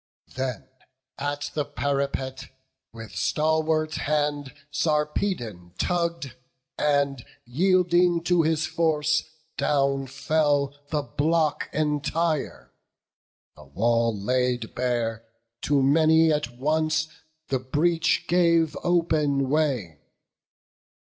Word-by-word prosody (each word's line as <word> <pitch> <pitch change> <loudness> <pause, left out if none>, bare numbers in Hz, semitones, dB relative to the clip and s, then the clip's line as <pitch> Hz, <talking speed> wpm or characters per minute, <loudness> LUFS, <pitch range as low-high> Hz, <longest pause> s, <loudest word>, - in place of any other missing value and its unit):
Then 130 -5 -4 0.5
at 145 0 -3
the 150 - 0
parapet, 140 -2 -3 0.4
with 115 -1 -10
stalwart 155 0 0
hand, 145 -2 -1 0.2
Sarpedon 150 - -1
tugg'd; 170 -6 -1 0.4
and 140 -3 +1 0.2
yielding 175 +4 +2
to 175 -1 +3
his 160 0 +1
force 160 -3 +1 0.4
Down 140 -1 +1
fell 140 0 +1 0.2
the 150 -2 -1
block 155 +2 0
entire; 155 +1 -1 0.8
the 75 - -15
wall 115 +8 +1
laid 125 +1 -1
bare, 120 -3 -1 0.4
To 140 -2 +2
many 160 +3 +4
at 120 -5 -3
once 155 +3 +1 0.4
the 130 - 0
breach 165 +6 +1
gave 170 -3 +3
open 150 -6 +1
way. 130 - 0
145 Hz, 90 wpm, -25 LUFS, 130-160 Hz, 0.8 s, many